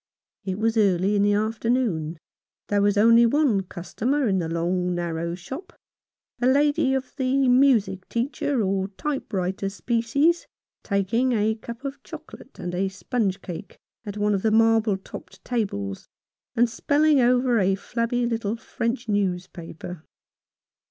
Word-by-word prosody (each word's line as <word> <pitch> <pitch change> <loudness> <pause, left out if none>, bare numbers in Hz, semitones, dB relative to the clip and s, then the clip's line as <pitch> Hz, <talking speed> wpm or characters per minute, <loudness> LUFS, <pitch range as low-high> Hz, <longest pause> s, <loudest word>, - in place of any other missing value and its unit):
It 190 -1 -3
was 225 +1 0
early 195 -1 +3
in 200 - +3
the 205 0 +3
afternoon. 215 -6 0 0.5
There 205 -1 +2
was 205 0 +2
only 230 +2 +6
one 265 -6 +2
customer 235 +10 -2
in 190 -2 +2
the 165 -2 -2
long, 180 +2 -1
narrow 170 0 -2
shop, 265 - -8 0.7
a 245 - +3
lady 285 +1 +3
of 260 -1 -4
the 265 0 +2
music 245 -7 +3
teacher 250 0 -1
or 190 0 0
type 275 +8 -4
writer 190 +1 -1
species, 235 - +1 0.3
taking 225 +6 +1
a 220 0 +2
cup 235 +4 -9
of 275 0 -5
chocolate - - -12
and 175 0 -5
a 190 +2 0
sponge 195 +1 -2
cake 180 +2 -8 0.3
at 205 -2 -6
one 210 0 +1
of 195 - 0
the 220 - +2
marble 225 -2 +3
topped 190 - -12
tables, 100 - -3 0.5
and 240 +1 +4
spelling 290 +5 +2
over 245 -1 +3
a 190 0 +2
flabby 235 +4 -1
little 225 -2 -1
French 235 +1 -3
newspaper. 180 -4 -3
220 Hz, 145 wpm, -24 LUFS, 190-245 Hz, 0.7 s, only